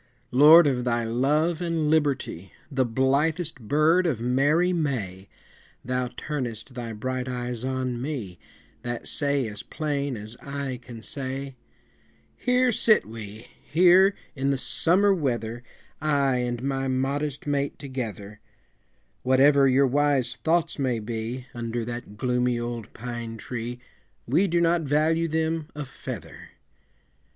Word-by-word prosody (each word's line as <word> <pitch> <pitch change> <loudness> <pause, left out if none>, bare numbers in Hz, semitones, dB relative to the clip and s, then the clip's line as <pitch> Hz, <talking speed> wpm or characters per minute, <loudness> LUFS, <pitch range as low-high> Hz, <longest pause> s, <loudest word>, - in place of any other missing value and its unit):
Lord 155 +6 +8
of 130 -4 +1
thy 120 -1 0
love 150 +9 +1
and 165 -3 0
liberty, 140 - 0 0.2
The 130 -2 +1
blithest 145 +6 +1
bird 155 - +3
of 135 -9 0
merry 145 +9 +2
May, 105 - -2 0.6
Thou 125 0 -1
turnest 125 -5 -4
thy 120 -2 -5
bright 130 +4 -3
eyes 125 -1 -4
on 130 -2 -2
me, 120 - -5 0.4
That 120 -1 -5
say 140 -4 0
as 105 0 -6
plain 140 -1 -3
as 110 +3 -8
eye 140 -3 -4
can 120 -2 -10
say 135 +2 -4 0.8
"Here 250 0 +2
sit 215 0 +4
we, 110 0 -9
here 185 +5 +5 0.2
in 135 0 0
the 140 - +1
summer 190 +8 +3
weather, 120 -8 -2 0.4
I 140 -4 +2
and 120 0 -2
my 135 0 -1
modest 135 +2 -1
mate 140 -1 -1
together; 110 -7 -6 0.8
Whatever 135 +2 +5
your 135 +1 +4
wise 140 -2 +1
thoughts 165 -1 0
may 130 -4 +1
be, 115 +3 -4
Under 115 -1 -3
that 120 -3 -7
gloomy 125 0 +1
old 120 -2 -5
pine 120 -1 -6
tree, 120 +2 -5 0.5
We 165 +11 +3
do 170 -1 +1
not 170 0 +3
value 155 +3 +2
them 160 0 -1
a 150 -1 -4
feather." 135 - -8
130 Hz, 130 wpm, -26 LUFS, 120-150 Hz, 0.8 s, Lord